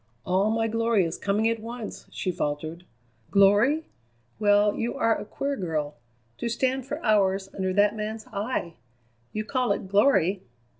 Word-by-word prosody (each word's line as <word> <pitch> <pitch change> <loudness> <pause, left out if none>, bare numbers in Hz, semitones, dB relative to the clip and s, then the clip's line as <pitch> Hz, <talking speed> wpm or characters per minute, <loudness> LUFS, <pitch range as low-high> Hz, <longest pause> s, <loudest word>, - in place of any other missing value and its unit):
"All 190 +3 +2
my 225 0 +1
glory 230 -3 +2
is 165 - -4
coming 205 +2 +1
at 230 0 0
once!" 230 0 -7
she 185 - -2
faltered. 155 +2 -4 0.4
"Glory? 210 +11 +4 0.5
Well, 205 0 +4
you 235 - -2
are 225 0 +2
a - - -6
queer 280 +6 -3
girl. 155 - -2 0.5
To 235 - -2
stand 260 +2 -1
for 290 +2 -4
hours 195 -3 +2
under 190 -1 -1
that 205 +2 +3
man's 215 +1 -4
eye! 200 -5 -3 0.5
You 215 0 -3
call 250 -1 0
it 195 - -5
glory? 195 -3 +3
210 Hz, 155 wpm, -26 LUFS, 190-230 Hz, 0.5 s, Glory